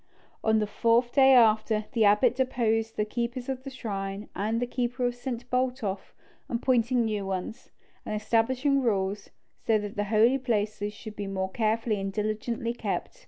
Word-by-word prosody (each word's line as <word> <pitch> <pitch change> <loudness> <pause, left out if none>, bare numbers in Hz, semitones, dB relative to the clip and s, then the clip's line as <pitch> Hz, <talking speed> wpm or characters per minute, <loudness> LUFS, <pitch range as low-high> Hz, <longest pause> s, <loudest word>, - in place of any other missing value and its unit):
On 220 0 +3
the 215 - +1
fourth 230 +3 +2
day 270 -1 +6
after, 220 -2 +4
the 225 -3 +3
abbot 210 +5 +4
deposed 225 -4 0
the 210 - +1
keepers 240 +3 -3
of 260 -1 -3
the 275 - -6
shrine 200 -5 -5
and 220 +3 -1
the 245 - 0
keeper 245 0 -2
of 245 - +1
St. 245 -1 -6
Botolph, 250 -6 -2 0.3
appointing 240 0 +2
new 210 -2 -2
ones, 195 +3 -5 0.3
and 215 - -4
establishing 255 +6 +1
rules, 200 -4 -1 0.4
so 225 - +4
that 205 -1 -5
the 205 - 0
holy 225 +5 +3
places 210 -4 -1
should 215 0 -10
be 205 -1 -5
more 190 -1 -3
carefully 220 -1 0
and 195 0 -3
diligently 215 +3 -2
kept. - - -4
225 Hz, 165 wpm, -27 LUFS, 210-245 Hz, 0.4 s, day